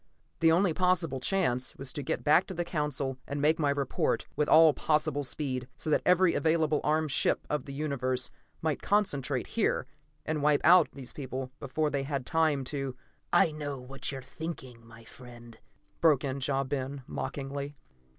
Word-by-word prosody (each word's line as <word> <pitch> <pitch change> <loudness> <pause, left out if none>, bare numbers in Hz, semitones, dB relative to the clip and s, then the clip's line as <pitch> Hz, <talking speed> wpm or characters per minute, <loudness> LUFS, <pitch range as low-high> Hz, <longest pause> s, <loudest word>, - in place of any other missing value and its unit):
The 165 0 +5
only 175 +1 +3
possible 175 -6 +1
chance 130 -6 0
was 135 -1 -5
to 145 - -4
get 135 - -2
back 155 +5 +4
to 190 - -6
the 175 +1 -2
Council 145 -5 -2
and 145 - -3
make 155 +3 +3
my 145 -2 +2
report, 140 -2 0
with 150 - 0
all 160 -1 +7
possible 150 -1 0
speed, 130 -2 -4
so 155 - -3
that - - +3
every 180 0 +5
available 160 -2 +2
armed 155 0 +1
ship - - +2
of 150 - -1
the 140 - -7
universe 130 -4 -2 0.3
might 155 -3 0
concentrate 195 -10 0
here, - - 0 0.4
and 155 -1 -1
wipe 150 0 +3
out 175 +1 +7
these 130 -3 -10
people 130 -2 -5
before 150 +2 -1
they 140 - 0
had 135 -2 -3
time 155 -3 +2
to 135 -1 -4 0.4
"I 160 - +4
know 145 -3 -5
what 135 +2 -6
you 135 - -5
are - - -7
thinking, 130 -5 -7
my 115 0 -14
friend," 120 -1 -13 0.4
broke 155 -5 +4
in 135 0 -3
Ja 135 0 0
Ben 135 0 -4
mockingly. 140 +2 -5
145 Hz, 180 wpm, -29 LUFS, 135-155 Hz, 0.4 s, all